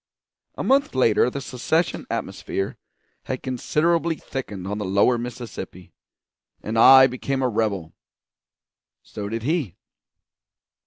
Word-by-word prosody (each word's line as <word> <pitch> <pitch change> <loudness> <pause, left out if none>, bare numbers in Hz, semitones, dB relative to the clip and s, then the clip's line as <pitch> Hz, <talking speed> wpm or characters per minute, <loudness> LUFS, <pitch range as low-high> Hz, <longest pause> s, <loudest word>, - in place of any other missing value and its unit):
A - - -4
month 275 - +2
later 120 -2 +3
the 140 - -5
secession 145 +6 -1
atmosphere 95 0 -3 0.5
had 130 - -4
considerably 160 +6 0
thickened 105 -11 -6
on 105 +1 -3
the - - -2
Lower 100 +6 +2
Mississippi, 115 -7 -8 0.7
and 110 - -4
I 130 +3 +9
became 135 +1 -2
a - - +3
rebel; 105 -7 -2 1.1
so 100 -1 -7
did 115 +1 -4
he. 145 - -1
125 Hz, 115 wpm, -23 LUFS, 105-135 Hz, 1.1 s, I